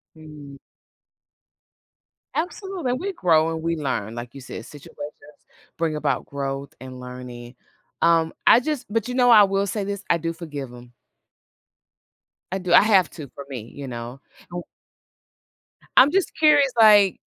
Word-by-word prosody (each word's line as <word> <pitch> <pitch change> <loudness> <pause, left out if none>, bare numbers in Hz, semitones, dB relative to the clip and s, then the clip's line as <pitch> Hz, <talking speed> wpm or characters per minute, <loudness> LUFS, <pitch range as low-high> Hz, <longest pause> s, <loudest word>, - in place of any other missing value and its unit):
Mm. 150 -3 -12 1.8
Absolutely, 360 -3 -3
and 255 - -2
we 390 +2 -3
grow 165 - +2
and 160 - -5
we 165 +1 -1
learn, 120 -7 -3
like 120 0 -7
you 135 - -10
said, 115 -2 -8
situations 145 -2 -14 0.8
bring 160 -2 -1
about - - -1
growth 140 0 -5
and 130 0 -9
learning. 125 -1 -9 0.5
Um, 165 -1 +3
I 240 - +7
just 300 -1 -3
but 225 0 -1
you 250 - -4
know, 250 -1 +4
I 215 -3 +8
will 195 0 0
say 205 0 -3
this, 200 0 -5
I 170 - +4
do 165 +1 -3
forgive 150 -6 -7
them. 120 0 -14 1.6
I 190 - -1
do, 180 -1 -1
I - - +9
have 200 -4 +4
to 145 -6 -9
for 140 - -8
me, 120 -4 -8
you 140 -1 -8
know? 120 +1 -7 0.3
I 175 - -4 1.4
I'm 270 +3 +8
just 385 0 +1
curious, 295 -4 +5
like, 205 -3 +6
165 Hz, 155 wpm, -23 LUFS, 135-215 Hz, 1.8 s, I